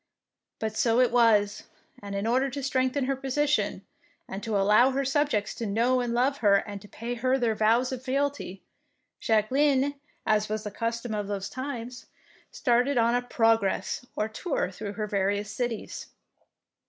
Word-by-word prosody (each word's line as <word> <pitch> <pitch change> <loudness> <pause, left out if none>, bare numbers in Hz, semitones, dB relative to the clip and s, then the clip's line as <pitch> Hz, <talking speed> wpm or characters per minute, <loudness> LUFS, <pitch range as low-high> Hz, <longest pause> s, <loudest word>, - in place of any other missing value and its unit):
But 220 -1 -3
so 230 +1 +2
it 250 -1 +4
was; 220 -4 +3 0.4
and 200 -1 -6
in 200 +1 -2
order 255 +4 +2
to 275 +1 -5
strengthen 260 0 0
her 270 +1 0
position, 280 +3 0 0.4
and 195 - -6
to 220 -2 -1
allow 210 +6 +5
her 270 +1 -1
subjects 270 -7 0
to 230 - -4
know 235 +5 +2
and 245 -1 -1
love 255 +4 +1
her 205 -3 +5
and 200 0 -2
to 205 - -13
pay 230 +3 -5
her 255 +2 +1
their 235 -4 +1
vows 230 +4 +2
of 255 -2 -4
fealty, 275 -7 -2 0.6
Jacqueline, 265 +6 +2 0.3
as 215 -1 +2
was 215 0 -2
the 210 - -5
custom 230 +2 -3
in 210 -1 -2
those 200 -1 -3
times, 245 -3 -6 0.4
started 250 +3 +1
on 235 0 +3
a 245 - +2
"progress," 225 -4 +1
or 215 - 0
tour 220 - -2
through 200 +2 -6
her 210 +1 -3
various 205 0 -1
cities. 235 0 -4
235 Hz, 165 wpm, -27 LUFS, 210-260 Hz, 0.6 s, allow